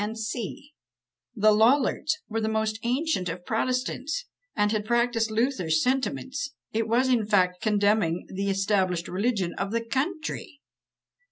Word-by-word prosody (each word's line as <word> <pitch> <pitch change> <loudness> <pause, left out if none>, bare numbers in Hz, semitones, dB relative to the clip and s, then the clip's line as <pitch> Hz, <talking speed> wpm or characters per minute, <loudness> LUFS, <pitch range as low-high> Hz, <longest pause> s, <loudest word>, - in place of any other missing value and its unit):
" - - +1 1.3
The 215 -1 +5
Lollards 265 +7 +3
were 225 0 -2
the 220 - 0
most 220 0 -1
ancient 250 - 0
of 175 +2 -6
protestants, 255 - -1 0.3
and 210 -1 +2
had 215 -1 0
practised 235 0 +1
Luther's 215 - +1
sentiments; 270 +1 -1 0.2
it 225 0 0
was, 240 +4 +3
in 235 -5 +2
fact, 180 -4 +2
condemning 205 -5 +2
the 195 +1 -3
established 195 -3 +1
religion 195 -2 -1
of 195 - -1
the 230 0 -1
country! 310 +4 -3
220 Hz, 135 wpm, -26 LUFS, 200-255 Hz, 1.3 s, The